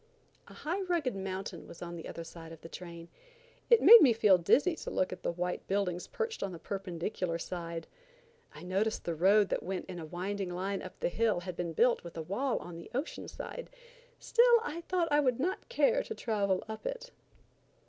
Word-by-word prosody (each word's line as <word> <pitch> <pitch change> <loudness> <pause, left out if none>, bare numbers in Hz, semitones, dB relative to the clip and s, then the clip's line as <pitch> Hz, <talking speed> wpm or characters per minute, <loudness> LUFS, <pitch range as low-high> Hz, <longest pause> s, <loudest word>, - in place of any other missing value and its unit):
A - - -13
high 355 +6 -2
rugged 340 - 0
mountain 190 -3 -5
was 170 - -11
on 175 0 -6
the 165 - -7
other 165 - -6
side 165 0 -11
of 165 - -11
the - - -9
train. 170 -2 -9 0.6
It 470 -2 +6
made 465 0 +11
me 255 -6 +7
feel 205 -4 +5
dizzy 295 - +3
to - - -6
look 185 - 0
at - - -9
the - - -1
white 180 +1 -3
buildings 190 -3 -1
perched 455 0 -3
on 195 - -2
the 175 - -7
perpendicular 180 -1 -3
side. 170 -1 -5 0.7
I 150 +2 -12
noticed 195 +5 -1
the 170 - -1
road 195 +5 +4
that - - -1
went 190 0 -4
in 180 -2 -7
a 160 - -6
winding 190 +3 -3
line 190 +3 -3
up 185 - -10
the - - +1
hill 215 -2 +1
had 180 -1 -6
been 170 -1 -3
built 240 +7 +3
with 170 -1 -9
a 160 - -3
wall 240 - -1
on 170 -1 -8
the 170 - -11
ocean 275 +5 -3
side; - - -7 0.5
still 475 0 +5
I 315 +3 -4
thought 360 -2 +2
I 295 - +5
would 255 -4 +2
not 360 - -2
care - - +3
to 445 - -6
travel 200 - 0
up 220 - -6
it. - - -5
195 Hz, 210 wpm, -31 LUFS, 175-275 Hz, 0.7 s, made